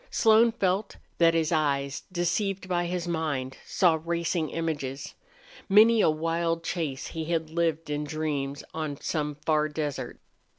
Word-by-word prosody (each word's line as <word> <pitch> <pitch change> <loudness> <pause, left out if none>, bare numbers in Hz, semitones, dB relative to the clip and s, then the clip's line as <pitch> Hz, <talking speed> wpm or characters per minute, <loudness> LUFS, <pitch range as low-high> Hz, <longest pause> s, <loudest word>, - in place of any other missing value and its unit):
Slone 225 +1 +5
felt 195 -2 0 0.2
that 165 -1 +5
his 160 -1 +1
eyes, 140 -3 0
deceived 185 +2 -1
by 175 -1 0
his 175 0 -3
mind, 150 -6 -2
saw 165 -4 +3
racing 170 -1 -1
images. 145 -5 -4 0.6
Many 220 +3 +6
a - - +5
wild 165 +1 -1
chase 155 -7 -3
he 160 -1 -5
had 160 -1 -1
lived 165 -1 0
in 150 0 -1
dreams 145 -2 -3
on 155 -3 -4
some 150 -2 -2
far 155 -1 +2
desert. 150 -2 -4
165 Hz, 140 wpm, -27 LUFS, 150-175 Hz, 0.6 s, Many